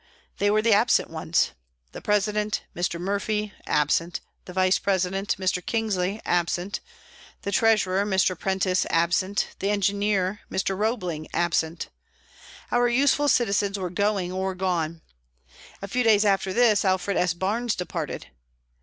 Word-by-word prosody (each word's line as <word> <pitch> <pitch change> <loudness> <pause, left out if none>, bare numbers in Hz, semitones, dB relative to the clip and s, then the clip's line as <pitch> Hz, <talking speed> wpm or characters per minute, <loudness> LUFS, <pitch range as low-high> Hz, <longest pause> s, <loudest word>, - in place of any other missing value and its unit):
They 205 - +3
were 215 +1 +2
the 230 -1 +4
absent 225 -1 +3
ones: 160 +1 0 0.4
The - - -9
president, 210 +1 0
Mr. 175 -1 -2
Murphy, 205 +2 -2
absent; 165 +4 +1 0.3
the - - -9
vice 185 0 +3
president, 195 +1 0
Mr. 185 -1 -1
Kingsley, 210 -3 -1
absent; 175 +2 0 0.6
the 200 - -2
treasurer, 200 -3 +3
Mr. 190 -2 +1
Prentice, 185 +1 0
absent; 180 +4 +1
the 195 - -1
engineer, 200 -1 0
Mr. 190 0 -1
Roebling, 185 -7 -2
absent. 165 -1 0 0.8
Our 245 0 +3
useful 280 +4 +3
citizens 205 -5 +2
were 185 -3 -4
going 200 -1 0
or 190 0 -2
gone. 170 -3 -2 0.8
A - - -3
few 250 +6 0
days 220 -3 +4
after 195 -1 +2
this 220 -1 +4
Alfred 190 0 +1
S. 180 -2 +1
Barnes 215 +6 -1
departed. 170 -4 -4
195 Hz, 135 wpm, -25 LUFS, 180-210 Hz, 0.8 s, the